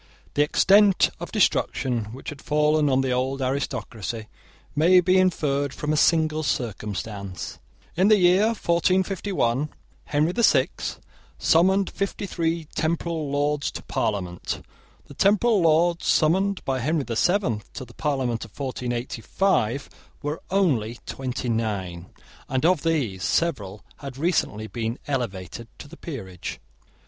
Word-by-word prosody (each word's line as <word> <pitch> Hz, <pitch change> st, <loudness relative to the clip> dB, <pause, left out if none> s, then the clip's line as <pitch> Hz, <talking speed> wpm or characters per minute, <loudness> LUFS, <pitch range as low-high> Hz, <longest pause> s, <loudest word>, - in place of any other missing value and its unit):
The 145 Hz, -, +2 dB
extent 195 Hz, +6 st, +5 dB
of -, -, -7 dB
destruction 125 Hz, -4 st, +1 dB
which 120 Hz, +6 st, -8 dB
had 145 Hz, -2 st, -9 dB
fallen 150 Hz, 0 st, +2 dB
on 130 Hz, 0 st, +3 dB
the 130 Hz, -1 st, -1 dB
old 130 Hz, +2 st, -1 dB
aristocracy 120 Hz, -5 st, -3 dB, 0.5 s
may 175 Hz, +5 st, +6 dB
be 185 Hz, +1 st, +4 dB
inferred 145 Hz, -6 st, +1 dB
from 150 Hz, +1 st, -2 dB
a -, -, +2 dB
single 155 Hz, 0 st, +3 dB
circumstance. 105 Hz, -7 st, -4 dB, 0.4 s
In 185 Hz, +3 st, +3 dB
the 215 Hz, 0 st, +6 dB
year 185 Hz, +2 st, +5 dB
1451 185 Hz, -, 0 dB, 0.4 s
Henry 150 Hz, +3 st, +1 dB
the 235 Hz, -, -1 dB
Sixth -, -, +2 dB, 0.4 s
summoned 190 Hz, +4 st, +3 dB
fifty 200 Hz, +1 st, -3 dB
three 165 Hz, -3 st, -1 dB
temporal 160 Hz, -1 st, -1 dB
Lords 145 Hz, 0 st, 0 dB
to -, -, -8 dB
parliament. 95 Hz, -6 st, -3 dB, 0.4 s
The -, -, -13 dB
temporal 205 Hz, -, +3 dB
Lords 170 Hz, +2 st, +3 dB
summoned 190 Hz, +5 st, +2 dB
by 135 Hz, -1 st, 0 dB
Henry 150 Hz, +4 st, 0 dB
the 120 Hz, -3 st, -4 dB
Seventh 155 Hz, -, 0 dB
to 130 Hz, -, -6 dB
the 120 Hz, -, -16 dB
parliament 130 Hz, -6 st, -1 dB
of 110 Hz, +2 st, -14 dB
1485 125 Hz, -, -1 dB, 0.4 s
were 150 Hz, +2 st, -3 dB
only 130 Hz, -, +1 dB
twenty 130 Hz, -1 st, -4 dB
nine, 100 Hz, -7 st, -2 dB, 0.4 s
and 130 Hz, +3 st, 0 dB
of 175 Hz, -3 st, +4 dB
these 135 Hz, -, -1 dB
several 105 Hz, -, -1 dB
had 135 Hz, -2 st, -8 dB
recently 140 Hz, -, 0 dB
been 115 Hz, +1 st, -3 dB
elevated 115 Hz, -, -4 dB
to -, -, -10 dB
the 160 Hz, -, -12 dB
peerage. 95 Hz, -, -7 dB
145 Hz, 135 wpm, -24 LUFS, 115-170 Hz, 0.5 s, may